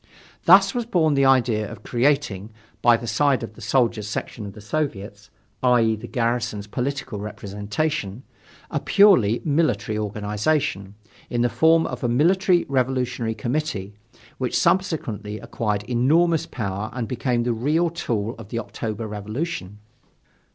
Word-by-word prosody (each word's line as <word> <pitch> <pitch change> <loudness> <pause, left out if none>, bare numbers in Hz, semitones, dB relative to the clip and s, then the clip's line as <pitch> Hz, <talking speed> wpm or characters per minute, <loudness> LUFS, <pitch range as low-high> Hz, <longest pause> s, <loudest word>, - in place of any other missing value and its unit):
Thus 195 +2 +7
was 240 -2 -2
born 165 -9 +2
the 140 -1 +3
idea 120 -5 +2
of - - -11
creating 120 -6 0 0.3
by 120 0 +5
the 120 - -8
side 135 0 +1
of 115 - -7
the 120 - -14
Soldiers' 115 -2 +1
section 105 0 -5
of 100 - -9
the 105 - -12
Soviet, 105 -4 -4 0.3
i. 125 -1 +4
e., 110 0 +2
the 110 - -9
garrison's 115 -4 -1
political 125 0 -3
representation 105 +4 -3 0.5
a - - 0
purely 175 - +4
military 125 -9 +1
organization, 105 +1 -1 0.3
in 120 - 0
the 120 - +2
form 160 +4 +4
of - - -5
a 120 - +1
Military 175 +7 +3
Revolutionary 125 -3 -1
Committee, 120 -7 -3 0.5
which - - 0
subsequently 110 - 0
acquired 105 -3 -2
enormous 150 +8 +2
power 100 -1 -4
and 120 -3 -3
became 125 0 -1
the 120 0 0
real 155 +9 +1
tool 115 -9 -2
of 105 -3 -10
the 115 - -4
October 110 0 -4
Revolution. 105 - -5
120 Hz, 145 wpm, -23 LUFS, 105-145 Hz, 0.5 s, Thus